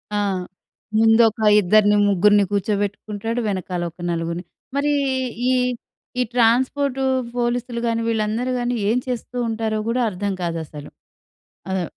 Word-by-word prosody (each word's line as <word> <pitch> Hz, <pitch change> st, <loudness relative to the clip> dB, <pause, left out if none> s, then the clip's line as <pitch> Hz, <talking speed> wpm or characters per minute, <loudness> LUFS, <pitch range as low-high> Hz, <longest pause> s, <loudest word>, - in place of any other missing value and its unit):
ఆ! -, -, +1 dB, 0.8 s
ముందొక 225 Hz, 0 st, +4 dB, 0.2 s
ఇద్దరిని, 205 Hz, +2 st, +4 dB
ముగ్గురిని 205 Hz, +2 st, +4 dB
కూర్చోబెట్టుకుంటాడు. 205 Hz, +2 st, -2 dB
వెనకాల 185 Hz, -3 st, -3 dB
ఒక 175 Hz, -, -43 dB
నలుగురిని. 170 Hz, +1 st, -3 dB, 0.3 s
మరి 290 Hz, +1 st, +1 dB, 0.6 s
ఈ -, -, +3 dB, 0.7 s
ఈ -, -, +4 dB
ట్రాన్స్‌పోర్టు, 255 Hz, +3 st, +2 dB, 0.3 s
పోలీస్‌లు 240 Hz, 0 st, -1 dB
గాని, 230 Hz, 0 st, 0 dB
వీళ్ళందరూ 225 Hz, +2 st, 0 dB
గాని 245 Hz, 0 st, -1 dB
ఏం 230 Hz, -, +2 dB
చేస్తూ 250 Hz, 0 st, -4 dB
ఉంటారో 220 Hz, -1 st, -1 dB
కూడా 240 Hz, +2 st, +1 dB
అర్థం 200 Hz, +1 st, -3 dB
కాదు 170 Hz, -1 st, -2 dB
అసలు? 150 Hz, -1 st, -10 dB, 0.8 s
అదే 190 Hz, -1 st, 0 dB
220 Hz, 120 wpm, -21 LUFS, 200-240 Hz, 0.8 s, ముందొక